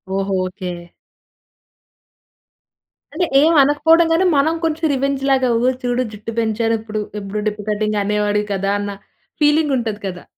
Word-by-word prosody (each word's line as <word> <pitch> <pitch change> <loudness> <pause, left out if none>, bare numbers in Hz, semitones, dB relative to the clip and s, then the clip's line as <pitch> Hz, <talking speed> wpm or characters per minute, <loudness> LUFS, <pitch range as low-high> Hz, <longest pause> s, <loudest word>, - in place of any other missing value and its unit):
ఓహో! 195 0 -1
ఓకె. 185 0 -5 2.4
అంటే, 355 +3 0 0.2
ఏమి 325 +2 +4
అనకపోవడం 320 +4 +4
గాని 335 +3 +3
మనం 295 +4 +3
కొంచెం 320 0 -1
రివెంజ్‌లాగా 270 -1 +1
"ఓహ్! 245 - +1 0.2
చూడు 245 +1 0
జుట్టు 215 +1 -7
పెంచాను 225 0 0
ఇప్పుడు. 215 -1 -4 0.2
ఎప్పుడు 200 +1 -5
డిప్ప 210 0 -3
కటింగ్ 210 0 0
అనేవాడివి 210 0 0
కదా" 195 +1 -1
అన్న 205 0 -4 0.5
ఫీలింగ్ 295 0 +3
ఉంటది 220 -3 -3
కదా! 180 -1 -7
225 Hz, 135 wpm, -19 LUFS, 210-290 Hz, 2.4 s, ఏమి